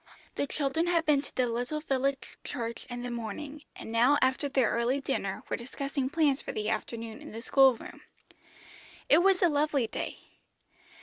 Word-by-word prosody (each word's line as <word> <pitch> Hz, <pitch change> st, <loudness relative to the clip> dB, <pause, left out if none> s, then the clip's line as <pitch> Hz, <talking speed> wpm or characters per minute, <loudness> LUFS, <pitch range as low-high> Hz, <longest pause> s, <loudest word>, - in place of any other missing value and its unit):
The 285 Hz, -, -1 dB
children 305 Hz, +4 st, 0 dB
had 335 Hz, -2 st, +2 dB
been 295 Hz, -2 st, +4 dB
to 280 Hz, -, -11 dB
the 255 Hz, -, +2 dB
little 245 Hz, +5 st, -2 dB
village 275 Hz, -2 st, -1 dB
church 230 Hz, -1 st, -5 dB
in 245 Hz, 0 st, -5 dB
the 245 Hz, -, -4 dB
morning, 240 Hz, +6 st, -5 dB
and -, -, -8 dB
now 245 Hz, +6 st, +5 dB
after 260 Hz, +2 st, +1 dB
their 265 Hz, -4 st, +2 dB
early 240 Hz, +4 st, +1 dB
dinner 200 Hz, -8 st, -2 dB
were -, -, -1 dB
discussing 275 Hz, +2 st, -3 dB
plans 295 Hz, -3 st, +2 dB
for -, -, -5 dB
the 215 Hz, 0 st, -2 dB
afternoon 225 Hz, -1 st, -4 dB
in -, -, -9 dB
the 225 Hz, +2 st, -7 dB
school 270 Hz, -2 st, +6 dB
room. -, -, -11 dB, 1.1 s
It -, -, +7 dB
was 380 Hz, +1 st, +4 dB
a -, -, +7 dB
lovely 295 Hz, -4 st, +1 dB
day. -, -, -4 dB
270 Hz, 180 wpm, -29 LUFS, 235-290 Hz, 1.1 s, It